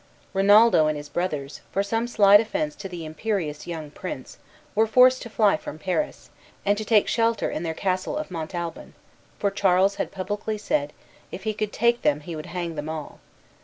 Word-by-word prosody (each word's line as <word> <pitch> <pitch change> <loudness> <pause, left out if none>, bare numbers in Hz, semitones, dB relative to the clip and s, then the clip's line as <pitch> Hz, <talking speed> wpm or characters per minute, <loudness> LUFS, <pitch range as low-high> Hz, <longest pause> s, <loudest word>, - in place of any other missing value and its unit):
Rinaldo 205 -3 +6
and 155 -1 0
his 145 0 -8
brothers, 145 -4 -3
for 195 - +1
some 225 +3 -1
slight 205 -3 +6
offence 300 +7 -2
to 195 - -7
the 175 -3 -7
imperious 155 -2 -3
young 160 -4 -6
prince, 150 -6 -7 0.3
were 220 +2 +3
forced 255 +3 +5
to 235 - -7
fly 210 -5 +3
from 155 - -8
Paris, 185 - -3 0.3
and 205 +1 +3
to - - -3
take 215 -1 +3
shelter 230 -1 +1
in - - -3
their 165 -2 -3
castle 185 - -1
of 305 -10 -5
Montalban; 170 0 -5 0.4
for 200 - 0
Charles 195 0 +3
had - - -2
publicly 205 +3 -3
said, 150 -8 -1 0.4
if 185 +2 -7
he 215 0 -1
could 210 0 -3
take 235 +1 +2
them 150 +1 +2
he 165 +2 -7
would 155 - -7
hang 175 -2 -4
them 150 0 -5
all. 155 -2 -6
195 Hz, 190 wpm, -25 LUFS, 160-215 Hz, 0.4 s, Rinaldo